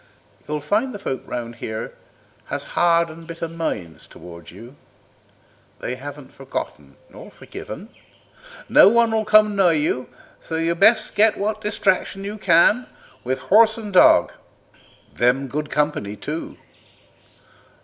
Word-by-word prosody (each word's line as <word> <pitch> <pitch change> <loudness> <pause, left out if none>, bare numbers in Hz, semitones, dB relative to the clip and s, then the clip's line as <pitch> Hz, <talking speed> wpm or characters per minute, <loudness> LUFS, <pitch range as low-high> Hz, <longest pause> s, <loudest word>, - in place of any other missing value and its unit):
You'll 150 0 -3
find 215 - -1
the - - -4
folk 135 -10 -5
around 120 -1 -6
here 110 -1 -6 0.5
has - - -5
hard 170 -1 +2
and 165 +1 -13
bitter 165 0 -5
minds 160 - -5
towards 85 -1 -13
you. 115 +9 -13 1.0
They 125 - -5
hasn't 140 +1 -10
forgotten 75 - -7 0.2
nor - - -12
forgiven. 195 - -10 0.8
No - - +7
one'll 225 -1 +2
come 215 -1 +4
nigh 185 -4 +4
you, 150 -4 -1 0.3
so 160 - -6
you'd 165 +1 -1
best 220 +2 +4
get 215 +1 +4
what 215 +2 -2
distraction 195 -2 -1
you 210 +2 -6
can 195 +6 +4 0.4
with 130 +1 -2 0.2
horse 220 +1 +6
and 210 -3 -7
dog. 185 - +6 0.8
They'm 125 +3 +1
good 150 +3 -4
company, 145 -9 -1
too." 155 +9 -6
165 Hz, 130 wpm, -21 LUFS, 130-205 Hz, 1.0 s, No